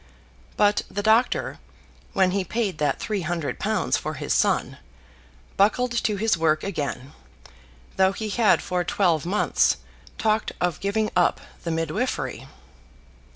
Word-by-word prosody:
But 205 0 +3
the 205 - -4
doctor, 225 +3 +2 0.5
when 190 -1 +3
he 195 0 0
paid 200 -3 -2
that 145 -2 0
three 210 -3 -2
hundred 170 -3 -3
pounds - - 0
for - - -4
his - - -2
son, - - +1 0.8
buckled 225 +5 +3
to 230 -3 0
his 220 +1 +2
work 155 -1 +2
again, 145 -7 -4 0.8
though 190 0 +4
he 215 +2 -5
had 215 -1 +3
for 180 -1 -1
twelve 170 -5 +1
months 205 +4 +2 0.4
talked 220 0 0
of 180 -1 0
giving 210 +2 0
up 180 -1 +3 0.2
the 170 - -3
midwifery. 165 - -2
195 Hz, 135 wpm, -24 LUFS, 170-215 Hz, 0.8 s, though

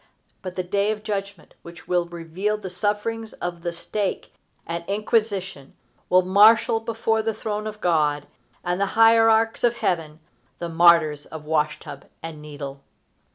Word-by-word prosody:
But 185 -2 -7
the 185 - -2
day 200 +3 0
of 215 -1 -3
judgment, 200 -4 -5
which 170 0 -13
will 175 -1 +1
reveal 175 +5 -3
the 195 -3 -7
sufferings 215 +3 -2
of 175 -1 -5
the 170 0 -2
stake 190 +4 -4 0.3
and 170 0 -4
inquisition, 200 - -1 0.3
will 185 0 +5
marshal 220 +5 +5
before 225 0 -1
the 220 -1 -2
throne 215 0 -4
of 215 0 -8
God 150 -4 +1 0.4
and 180 +2 -1
the 200 - +2
hierarchs 225 0 +5
of 240 -1 +3
heaven 165 -8 -2 0.4
the 170 - -5
martyrs 165 -3 +4
of 155 -1 -9
wash 150 -1 0
tub 140 -1 -10 0.2
and 160 -2 -7
needle. 140 -2 -8
185 Hz, 155 wpm, -23 LUFS, 165-215 Hz, 0.4 s, will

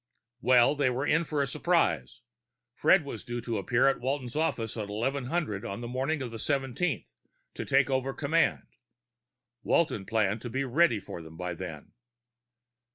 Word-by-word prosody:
Well, 125 +1 +5
they 140 -3 +2
were 130 +3 -1
in 160 +3 +2
for 150 -2 0
a - - -2
surprise. 65 - 0 0.5
Fred - - +4
was - - -6
due 120 0 -4
to 115 -2 -2
appear 120 +6 +2
at 135 - +2
Walton's 130 -1 -3
office 120 -8 -1
at 110 -3 -4
1100 125 - -2
on 100 +4 -5
the 120 - -5
morning 135 +4 -1
of 120 - -5
the 115 - -7
seventeenth 140 +5 -1 0.4
to - - -5
take 135 0 +3
over 130 0 0
command. 155 +4 +1 1.0
Walton 110 - +1
planned 110 -1 +1
to 120 - -5
be 135 +4 -1
ready 130 -3 +3
for 85 - -8
them 80 0 -12
by 90 0 -3
then. 80 -4 -8
125 Hz, 165 wpm, -29 LUFS, 110-140 Hz, 1.0 s, Well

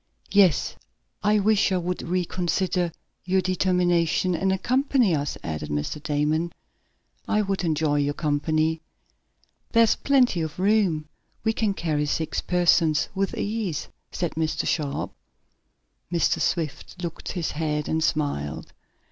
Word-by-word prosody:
"Yes, 190 -7 +4 0.4
I 210 +1 +3
wish 210 0 +3
you 185 -1 +1
would 180 +1 -3
reconsider 180 0 0 0.3
your 185 +1 +2
determination, 180 -1 +2
and 190 +3 +1
accompany 250 - +2
us," 145 -2 -1
added 75 -2 -4
Mr. 75 - -3
Damon. 150 +3 0 0.8
"I 210 0 +2
would 195 -1 -2
enjoy 155 -3 +1
your 145 0 0
company." 155 +1 0 0.9
"There's 230 -1 +5
plenty 250 -10 +3
of 160 -1 -4
room. 190 -6 +2 0.4
We 220 - +2
can 215 -3 0
carry 150 -4 -1
six 155 0 -1
persons 165 -3 +3
with 195 0 -1
ease," 205 -8 -2 0.2
said 175 -2 -2
Mr. 160 -1 -1
Sharp. 145 -4 -1 1.0
Mr. 170 -1 +1
Swift 165 +1 -2
shook 170 -2 -6
his 175 -4 -2
head, 150 -1 -2
and 160 0 0
smiled. 145 - -2
170 Hz, 125 wpm, -25 LUFS, 155-190 Hz, 1.0 s, There's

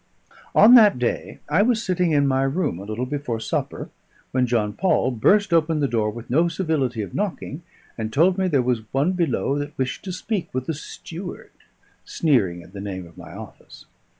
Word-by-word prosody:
On 230 +3 +8
that 215 - +7
day 125 -1 -2
I 165 +6 +3
was 225 0 +2
sitting 180 -3 +1
in 145 -2 +3
my 135 0 +2
room 135 - -1
a 100 - -8
little 110 +4 -3
before 130 -4 -3
supper, 110 - -3 0.4
when 130 -1 +1
John 110 -4 0
Paul 175 - +1
burst 195 - +3
open 160 -1 +2
the 140 - +2
door 110 -4 0
with 115 +2 -8
no 160 +8 +3
civility 145 - -1
of - - -9
knocking, 180 -6 -3 0.4
and 110 0 -3
told 170 +9 +4
me 190 - +2
there 140 -7 +2
was 120 -3 -2
one 140 +7 +2
below 155 -5 0
that 145 +1 -6
wished 130 -1 -3
to 190 - -4
speak 185 +1 -3
with 130 0 -2
the 160 - -2
steward; 170 +4 -8 0.5
sneering 100 - +1
at 90 - -17
the 100 - -7
name 95 -3 -5
of 85 -1 -16
my - - -11
office. - - -12
140 Hz, 195 wpm, -23 LUFS, 115-175 Hz, 0.5 s, On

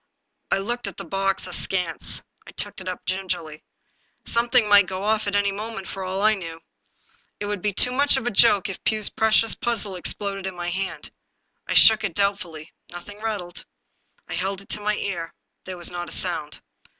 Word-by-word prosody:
I - - +2
looked 235 +3 -3
at 200 - -7
the - - -7
box 195 0 -1
askance. 180 -1 +1 0.2
I - - -9
took - - -5
it 185 - -5
up 180 - -7
gingerly. 180 -5 -3 0.6
Something 235 -1 +3
might 205 -2 +6
go 185 +1 -4
off 215 0 +1
at 200 - -1
any 200 0 +2
moment 210 -1 -6
for 195 - -5
all 190 +2 -2
I 215 0 +5
knew. 165 -5 -6 0.8
It 205 - -3
would 205 -2 -3
be 210 - 0
too 250 +5 +2
much 280 +2 +4
of 265 - -3
a 245 - 0
joke 205 -2 +5
if 195 - -7
Pugh's 215 -1 +1
precious 220 0 +4
puzzle 225 -6 -1
exploded 195 +1 -2
in 190 - -5
my 175 0 -3
hand. 190 +2 -4 0.6
I - - -1
shook 220 -1 +7
it 185 -6 -2
doubtfully; 185 -6 -2 0.2
nothing 190 +4 -10
rattled. 205 -6 -4 0.6
I - - -6
held 195 +1 -2
it 195 - -17
to 210 - -2
my 210 0 +1
ear. 175 -5 -4 0.3
There 185 -1 -6
was 175 0 +2
not 175 0 -5
a - - -8
sound. 155 -5 -2
195 Hz, 195 wpm, -24 LUFS, 180-215 Hz, 0.8 s, shook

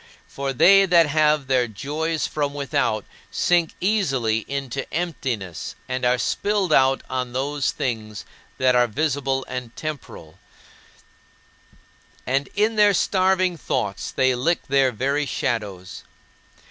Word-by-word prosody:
For 140 0 -4
they 195 +9 +6
that 170 -2 +5
have 150 -1 +2
their 130 -2 +2
joys 150 +8 -3
from 145 -1 -2
without 115 -6 -1 0.2
sink 175 -2 +1
easily 135 - +1
into 135 -1 -4
emptiness 130 - -4
and 130 0 -3
are 125 0 +3
spilled 200 +5 0
out 135 -1 +3
on 125 -1 -3
those 140 +2 -1
things 110 -4 -4 0.3
that 130 -1 +3
are 125 0 +4
visible 135 +1 -1
and 125 -2 -6
temporal, 140 - -7 1.9
and 135 +2 0
in 215 +2 +1
their 205 -1 +5
starving 185 -1 +2
thoughts 105 -7 -3
they 130 0 +2
lick 150 +8 0
their 135 -1 +3
very 140 +5 -1
shadows. 100 -9 -3
135 Hz, 120 wpm, -23 LUFS, 125-160 Hz, 1.9 s, they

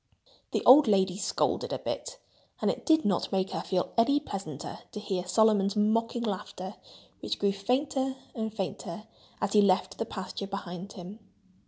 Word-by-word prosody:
The - - 0
old 280 +2 +9
lady 190 -3 +3
scolded 200 - 0
a - - -1
bit. - - -5 0.4
And - - +2
it - - -8
did 315 -1 +4
not 195 -4 +1
make 190 -1 0
her - - -2
feel 185 -2 -1
any 280 +5 +4
pleasanter 190 - -6
to 210 - -4
hear 190 -4 -3
Solomon's 205 -1 +3
mocking 230 +3 +1
laughter, 190 -2 -4 0.4
which - - -3
grew 200 0 +2
fainter 265 +6 0 0.2
and 220 -2 -3
fainter 195 -2 -5 0.4
as 200 - 0
he 210 - +7
left 195 -1 +2
the 225 - 0
pasture 195 0 -5
behind 190 -1 -6
him. 190 +4 -9
205 Hz, 165 wpm, -29 LUFS, 190-230 Hz, 0.4 s, old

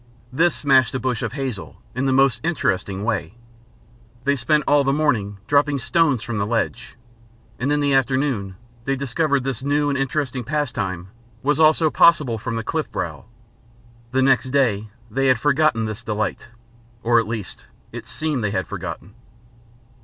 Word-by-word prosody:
This 170 +6 +3
smashed 135 -4 +3
a - - 0
bush 125 -3 -1
of 115 -1 -3
hazel 130 -7 -5
in 125 +3 -1
the - - +2
most 135 0 +3
interesting 100 - -1
way. 105 -4 -2 0.9
They 140 0 +2
spent 150 +2 +2
all 145 0 +4
the 135 - +2
morning 125 -9 0
dropping 145 +3 +2
stones 140 -1 +1
from 115 -3 -3
the 100 - 0
ledge, 115 0 -2 0.6
and 135 +4 0
in 145 0 +2
the 145 -1 +2
afternoon 130 -7 0 0.3
they 135 - +1
discovered 140 +1 0
this 135 -2 -3
new 145 +1 +1
and 140 - 0
interesting 135 -2 -2
pastime 110 - -3 0.3
was 150 +2 +1
also 155 0 +4
possible 150 -9 +4
from 115 +1 -4
the 115 - -2
cliffbrow. - - -3 0.9
The 130 +1 +2
next 130 -1 +3
day 115 -6 +1 0.2
they 135 +4 +1
had 130 -2 +4
forgotten 145 -4 +2
this 110 +1 -5
delight. 110 +1 -3 0.6
Or 120 0 +4
at 115 - -2
least, 110 -3 -6 0.2
it - - -8
seemed 150 -6 -2
they 105 - +1
had 95 -2 -1
forgotten. 100 - -7
130 Hz, 160 wpm, -22 LUFS, 115-145 Hz, 0.9 s, all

